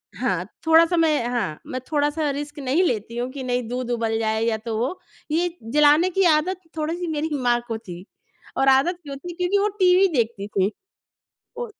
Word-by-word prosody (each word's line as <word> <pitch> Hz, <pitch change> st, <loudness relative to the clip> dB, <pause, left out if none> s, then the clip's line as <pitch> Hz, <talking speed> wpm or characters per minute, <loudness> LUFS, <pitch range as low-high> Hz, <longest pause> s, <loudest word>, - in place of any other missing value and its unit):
हाँ। -, -, -1 dB, 0.2 s
थोड़ा-सा 330 Hz, +2 st, +5 dB
मैं 310 Hz, -6 st, +2 dB
हाँ। 230 Hz, -11 st, -2 dB
मैं 255 Hz, -, -4 dB
थोड़ा-सा 295 Hz, +1 st, +1 dB
रिस्क 290 Hz, +1 st, -6 dB
नहीं 280 Hz, +7 st, +1 dB
लेती 235 Hz, -, -2 dB
हूँ 245 Hz, +1 st, -2 dB
कि 275 Hz, -1 st, -6 dB
नहीं 245 Hz, -2 st, -1 dB
दूध 250 Hz, 0 st, -4 dB
उबल 225 Hz, -1 st, 0 dB
जाए 220 Hz, 0 st, 0 dB
या 225 Hz, -1 st, +1 dB
तो 220 Hz, 0 st, -4 dB
वो। 260 Hz, +11 st, -2 dB, 0.3 s
ये 345 Hz, +3 st, +1 dB, 0.2 s
जलाने 300 Hz, +4 st, +5 dB
की 385 Hz, +2 st, +1 dB
आदत 355 Hz, +5 st, 0 dB, 0.2 s
थोड़ी-सी 330 Hz, +3 st, -2 dB
मेरी 315 Hz, 0 st, -2 dB
माँ 240 Hz, -1 st, +2 dB
को 225 Hz, -1 st, -3 dB
थी 180 Hz, -4 st, -10 dB, 0.5 s
और 270 Hz, 0 st, +2 dB
आदत 335 Hz, +7 st, +3 dB
क्यों 280 Hz, -1 st, -7 dB
थी 350 Hz, +4 st, -8 dB
क्योंकि 360 Hz, +3 st, +1 dB
वो 405 Hz, +1 st, +2 dB
टीवी 370 Hz, +1 st, +5 dB
देखती 225 Hz, -4 st, -1 dB
थी। 200 Hz, -1 st, 0 dB, 0.9 s
वो 485 Hz, -, -3 dB
280 Hz, 190 wpm, -23 LUFS, 235-335 Hz, 0.9 s, थोड़ा-सा